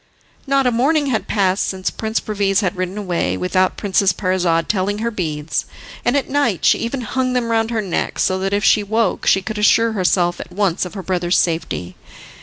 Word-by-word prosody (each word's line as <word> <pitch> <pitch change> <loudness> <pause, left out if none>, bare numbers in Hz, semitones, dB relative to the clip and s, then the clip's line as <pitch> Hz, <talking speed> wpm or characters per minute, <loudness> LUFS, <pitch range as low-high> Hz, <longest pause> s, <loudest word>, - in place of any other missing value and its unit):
Not 275 0 +2
a 250 - +3
morning 285 +6 +2
had 220 - -1
passed 195 -2 +1
since 190 -1 -3
Prince 220 0 -2
Perviz 200 -1 0
had 195 -1 -1
ridden 185 +2 -3
away 180 -5 -1
without 185 0 0
Princess 195 -1 +2
Parizade 180 -3 0
telling 205 0 0
her 230 +2 -2
beads, 160 -6 -2 0.4
and 245 +4 +2
at 280 - -1
night 265 - 0
she - - +4
even 245 +3 -3
hung 255 +2 -1
them 240 -2 -1
round 225 0 +1
her 225 -2 -1
neck, 185 - -2
so 185 0 +1
that 195 +1 -2
if 205 +1 0
she 215 - +4
woke 220 0 -1
she 190 - +4
could 220 0 -4
assure 225 +2 +4
herself 180 -3 +1
at - - -8
once 190 -2 0
of 180 - -9
her 190 - -6
brother's 180 0 0
safety. 160 - -1
200 Hz, 205 wpm, -19 LUFS, 185-225 Hz, 0.4 s, she